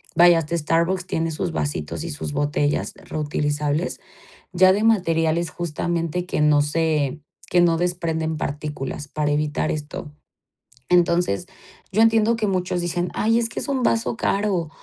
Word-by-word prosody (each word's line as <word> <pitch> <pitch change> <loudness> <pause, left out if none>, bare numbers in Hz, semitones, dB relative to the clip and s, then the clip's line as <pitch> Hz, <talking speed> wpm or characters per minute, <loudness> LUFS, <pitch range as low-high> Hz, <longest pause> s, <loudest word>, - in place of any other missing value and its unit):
Vaya, 175 -1 +7
hasta 165 +1 -2
Starbucks 170 +4 0
tiene 165 -2 -1
sus 165 +3 -3
vasitos 145 - -3
y 170 - -5
sus 145 -1 -4
botellas 145 0 0
reutilizables, 150 +1 -2 0.5
ya 185 +1 +6
de 205 +3 +1
materiales 165 -6 +2
justamente 175 0 -2
que 150 - -1
no 150 -1 +5
se 150 -1 0 0.3
que 180 - +3
no 170 -1 +3
desprenden 165 -3 -1
partículas 145 -1 -4
para 150 0 -1
evitar 150 0 0
esto. 150 0 -5 0.8
Entonces, 175 - +2 0.4
yo 210 +3 +2
entiendo 225 0 +4
que 220 -1 -1
muchos 180 -2 -1
dicen, 175 +1 -1
ay, 225 +2 +2
es 230 -1 0
que - - -5
es - - -5
un 275 -2 0
vaso 230 -1 +1
caro 195 -7 0
165 Hz, 150 wpm, -22 LUFS, 150-180 Hz, 0.8 s, Vaya